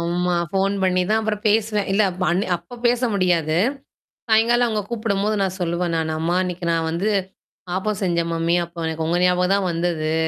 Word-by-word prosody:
ஆமா. 175 Hz, +1 st, 0 dB, 0.2 s
ஃபோன் 195 Hz, +1 st, +1 dB
பண்ணி 185 Hz, -1 st, +2 dB
தான் 220 Hz, -, +3 dB
அப்புறம் 210 Hz, -1 st, -2 dB
பேசுவேன். 210 Hz, -1 st, +1 dB
இல்ல 210 Hz, -, +3 dB
அப் 180 Hz, +1 st, -6 dB
அன்னிக் 185 Hz, +1 st, 0 dB
அப்ப 175 Hz, +8 st, -13 dB
பேச 240 Hz, 0 st, +2 dB
முடியாது. 170 Hz, -5 st, +1 dB, 0.7 s
சாயங்காலம் 235 Hz, +2 st, +4 dB
அவங்க 215 Hz, -2 st, -1 dB
கூப்பிடும்போது 215 Hz, -2 st, -1 dB
நான் 190 Hz, 0 st, -2 dB
சொல்லுவேன். 170 Hz, 0 st, -1 dB
நானு 160 Hz, -1 st, -1 dB
அம்மா 170 Hz, +2 st, 0 dB
இன்னைக்கு 180 Hz, -1 st, -4 dB
நான் 165 Hz, -1 st, 0 dB
வந்து 170 Hz, +6 st, -1 dB, 0.7 s
ஆப்பம் 210 Hz, +1 st, -2 dB
செஞ்சன் 170 Hz, -2 st, 0 dB
மம்மி. 165 Hz, +1 st, +1 dB
அப்ப 170 Hz, -1 st, -6 dB
எனக்கு 160 Hz, 0 st, -3 dB
உங்க 175 Hz, -, +1 dB
ஞாபகம் 180 Hz, +1 st, +2 dB
தான் 200 Hz, -2 st, 0 dB
வந்தது. 165 Hz, -2 st, -1 dB
180 Hz, 180 wpm, -22 LUFS, 170-210 Hz, 0.7 s, சாயங்காலம்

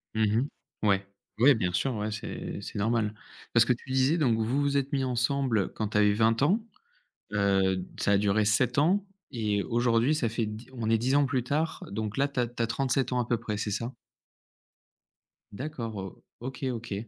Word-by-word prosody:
Mmh 110 Hz, 0 st, +2 dB
mh. -, -, -3 dB, 0.4 s
Ouais, 100 Hz, -1 st, +2 dB, 0.3 s
ouais, 135 Hz, +2 st, +7 dB
bien 90 Hz, -4 st, -1 dB
sûr, 125 Hz, +8 st, 0 dB
ouais, 105 Hz, +1 st, -2 dB
c'est 110 Hz, -, -5 dB
c'est -, -, -6 dB
normal. 110 Hz, 0 st, +1 dB, 0.4 s
Parce 115 Hz, -1 st, +6 dB
que 125 Hz, -, +3 dB
tu 130 Hz, +2 st, -10 dB
disais 135 Hz, +5 st, +3 dB
donc 120 Hz, -8 st, +2 dB
vous 125 Hz, +6 st, +1 dB
vous 140 Hz, 0 st, +1 dB
êtes 140 Hz, +1 st, -1 dB
mis 135 Hz, -1 st, +1 dB
ensemble 125 Hz, -3 st, 0 dB
quand 110 Hz, -2 st, -2 dB
tu 105 Hz, -, -1 dB
avais 105 Hz, -1 st, +5 dB
20 115 Hz, +2 st, +2 dB
ans. 190 Hz, +11 st, +3 dB, 0.7 s
Heu, 95 Hz, -2 st, +2 dB
d 90 Hz, -, -5 dB
ça 100 Hz, -, +2 dB
a 100 Hz, -, +5 dB
duré 105 Hz, +1 st, +2 dB
7 115 Hz, +5 st, +2 dB
ans 185 Hz, +7 st, +3 dB, 0.3 s
et 105 Hz, -4 st, 0 dB
aujourd'hui, 120 Hz, +4 st, +2 dB
ça 120 Hz, -7 st, 0 dB
fait 115 Hz, 0 st, -1 dB
d 110 Hz, +3 st, -7 dB
on 115 Hz, -3 st, -3 dB
est 115 Hz, -, +4 dB
10 130 Hz, +5 st, +1 dB
ans 145 Hz, -, +5 dB
plus 130 Hz, -2 st, 0 dB
tard, 155 Hz, +5 st, -1 dB
donc 105 Hz, 0 st, -3 dB
là 140 Hz, +1 st, +2 dB
tu 135 Hz, -, -3 dB
as 120 Hz, -, +2 dB
tu 120 Hz, 0 st, -3 dB
as 115 Hz, -, 0 dB
37 130 Hz, +2 st, 0 dB
ans 125 Hz, -, +1 dB
à 120 Hz, -, 0 dB
peu 120 Hz, -, +1 dB
près, 105 Hz, -2 st, -4 dB
c'est 105 Hz, -1 st, -2 dB
ça? 115 Hz, +4 st, -2 dB, 1.6 s
D'accord 120 Hz, -2 st, -5 dB
o 95 Hz, -1 st, -7 dB, 0.2 s
OK, 130 Hz, +3 st, -6 dB
OK, 115 Hz, -3 st, -5 dB
115 Hz, 210 wpm, -28 LUFS, 105-130 Hz, 1.6 s, ouais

